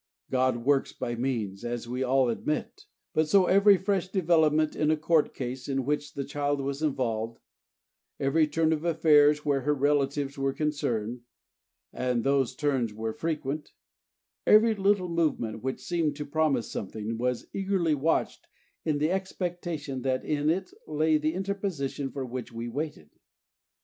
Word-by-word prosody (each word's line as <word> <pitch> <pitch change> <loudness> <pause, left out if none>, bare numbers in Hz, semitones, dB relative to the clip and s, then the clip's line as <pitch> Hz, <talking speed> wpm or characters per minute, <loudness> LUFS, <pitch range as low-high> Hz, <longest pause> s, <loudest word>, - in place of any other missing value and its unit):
God 130 -2 +1
works 140 -1 +2
by 120 - -3
means, 115 -5 -2
as 120 0 -4
we 125 +2 -3
all 130 0 +3
admit; 155 - -3 0.3
and 155 0 +2
so 190 +4 +5
every 200 +2 +6
fresh 190 -1 0
development 160 -5 +2
in 150 - +1
a 155 - +3
Court 155 0 +2
case 125 +1 -5
in 135 -2 -1
which 145 +1 -2
the 140 - -2
child 145 +1 -1
was 140 +1 -3
involved, 115 -6 -1 0.8
every 150 +3 +3
turn 160 +1 +2
of 155 0 -3
affairs, 150 -3 +4
where 140 -2 +2
her 150 +3 +1
relatives 140 0 0
were 135 0 0
concerned 125 -7 -2 0.7
(and 125 -2 -1
these 135 -2 +1
turns 130 -7 0
were 110 0 -3
frequent), 150 0 -3 0.7
every 220 +1 +6
little 200 -2 +2
movement 155 -10 -1
which 130 +1 -3
seemed 165 -4 -1
to 150 0 -5
promise 145 -5 0
something, 110 +3 -4
was 125 0 -1
eagerly 190 -5 +1
watched 150 +3 0 0.4
in 155 -2 0
the 155 +3 +1
expectation 175 -7 -3
that 130 0 -1
in 150 0 0
it 185 +3 -1 0.2
lay 155 0 +2
the 155 +2 -1
interposition 185 -8 -3
for 135 -1 -5
which 125 -1 -6
we 115 +1 -5
waited. 135 - -5
145 Hz, 155 wpm, -28 LUFS, 130-160 Hz, 0.8 s, every